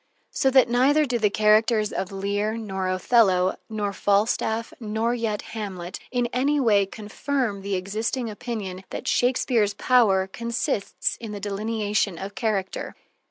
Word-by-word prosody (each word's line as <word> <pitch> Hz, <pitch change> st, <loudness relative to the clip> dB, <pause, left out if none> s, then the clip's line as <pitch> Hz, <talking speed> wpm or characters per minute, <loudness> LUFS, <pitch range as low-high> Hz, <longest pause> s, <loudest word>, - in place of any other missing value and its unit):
So 265 Hz, -, +2 dB
that 260 Hz, -2 st, +5 dB
neither 270 Hz, +6 st, +3 dB
do 245 Hz, -3 st, -1 dB
the 210 Hz, -2 st, +3 dB
characters 215 Hz, +1 st, +3 dB
of 190 Hz, -, -3 dB
Lear 205 Hz, +3 st, -1 dB
nor 190 Hz, -4 st, -3 dB
Othello 185 Hz, -1 st, +3 dB
nor 210 Hz, -2 st, -2 dB
Falstaff 220 Hz, +3 st, 0 dB
nor 220 Hz, +1 st, -1 dB
yet 225 Hz, -3 st, -2 dB
Hamlet 190 Hz, -5 st, -5 dB
in 245 Hz, -1 st, 0 dB
any 280 Hz, +4 st, +2 dB
way 205 Hz, -6 st, +3 dB
confirm 215 Hz, +1 st, -3 dB
the 200 Hz, 0 st, -2 dB
existing 220 Hz, +6 st, -2 dB
opinion 205 Hz, -4 st, -5 dB
that -, -, -6 dB
Shakespeare's 240 Hz, -4 st, +2 dB
power 210 Hz, -5 st, +3 dB
consists 230 Hz, 0 st, -2 dB
in 225 Hz, -3 st, -7 dB
the 205 Hz, -, -5 dB
delineation 210 Hz, -1 st, -1 dB
of 195 Hz, +3 st, -6 dB
character. 210 Hz, -6 st, -2 dB
215 Hz, 140 wpm, -24 LUFS, 200-235 Hz, -, that